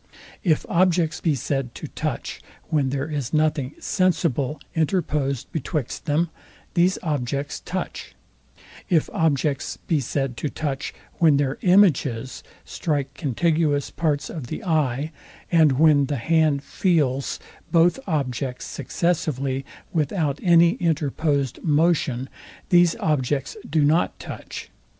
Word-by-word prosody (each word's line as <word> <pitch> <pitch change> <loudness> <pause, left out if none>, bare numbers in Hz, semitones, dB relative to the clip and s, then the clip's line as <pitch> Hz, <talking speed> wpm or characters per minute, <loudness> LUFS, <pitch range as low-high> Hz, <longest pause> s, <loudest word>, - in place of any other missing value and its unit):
If 160 -5 +2
objects 170 -2 +2
be 160 -4 +2
said 135 -1 -2
to - - -6
touch, - - -4 0.3
when 145 -5 +1
there 140 +2 -2
is 145 -3 -3
nothing 155 -3 +1
SENSIBLE 160 - 0
interposed 150 - 0
betwixt 155 -3 -3
them, 160 +2 +1 0.4
these 180 +1 +3
objects 140 -3 -2
touch: - - -5 0.7
it 165 -4 +3
objects 145 -3 0
be 160 - 0
said 135 0 -2
to 150 - -2
touch, 140 -2 -3 0.3
when 155 -4 +5
their 140 -1 0
IMAGES 145 - +3 0.2
strike 140 -4 -2
contiguous 145 +2 0
parts 150 -4 -1
of 150 -7 -6
the 225 - -5
eye, 155 - 0 0.4
and 160 -5 +5
when 145 0 +4
the 145 - -1
hand 155 +2 +2
FEELS 140 -9 0 0.3
both 175 +7 +4
objects 130 -5 -2
successively, 140 -3 -1 0.3
without 150 -2 0
any 170 -2 +6
interposed 145 -4 0
motion, 150 -5 +2 0.4
these 175 -1 +5
objects 135 -2 -1
do 150 -1 +3
not 160 +4 +2
touch. - - -8
150 Hz, 120 wpm, -23 LUFS, 135-165 Hz, 0.7 s, any